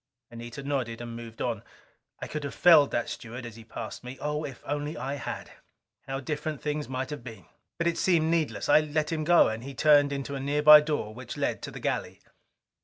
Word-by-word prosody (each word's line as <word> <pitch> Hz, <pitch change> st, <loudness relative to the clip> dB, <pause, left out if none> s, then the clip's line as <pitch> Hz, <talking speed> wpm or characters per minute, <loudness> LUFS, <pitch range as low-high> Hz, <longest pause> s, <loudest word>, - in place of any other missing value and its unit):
Anita 120 Hz, +3 st, -8 dB
nodded 130 Hz, -5 st, -2 dB
and 120 Hz, -1 st, -7 dB
moved 115 Hz, -1 st, -7 dB
on. 115 Hz, -4 st, -2 dB, 0.6 s
I -, -, -4 dB
could 150 Hz, -1 st, -5 dB
have 140 Hz, -, -5 dB
felled 165 Hz, -5 st, +7 dB
that 120 Hz, -, -1 dB
steward 120 Hz, +2 st, -7 dB
as 115 Hz, -2 st, -8 dB
he 115 Hz, -, -12 dB
passed 115 Hz, -, -7 dB
me. 125 Hz, +2 st, -8 dB
Oh, 150 Hz, +1 st, -2 dB
if 135 Hz, -5 st, -8 dB
I -, -, -11 dB
only 145 Hz, +2 st, -2 dB
had, 135 Hz, 0 st, -5 dB, 0.6 s
how 135 Hz, 0 st, -3 dB
different 150 Hz, +1 st, -4 dB
things 150 Hz, +2 st, -3 dB
might 130 Hz, +2 st, -3 dB
have 145 Hz, -5 st, -6 dB
been! 110 Hz, -8 st, -10 dB, 0.3 s
But 170 Hz, -, -1 dB
it 170 Hz, -1 st, +1 dB
seemed 165 Hz, -3 st, +3 dB
needless. 165 Hz, -3 st, 0 dB
I 145 Hz, -, +7 dB
let 155 Hz, 0 st, -1 dB
him 155 Hz, -1 st, -1 dB
go, 170 Hz, +2 st, +6 dB
and 110 Hz, +1 st, -5 dB
he 135 Hz, +1 st, -8 dB
turned 145 Hz, +1 st, +5 dB
into 140 Hz, 0 st, -4 dB
a 140 Hz, -, -3 dB
nearby 150 Hz, +2 st, +7 dB
door 150 Hz, -8 st, -2 dB
which 125 Hz, +1 st, -8 dB
led -, -, -1 dB
to -, -, -6 dB
the -, -, -9 dB
galley. -, -, -3 dB
140 Hz, 215 wpm, -28 LUFS, 120-150 Hz, 0.6 s, felled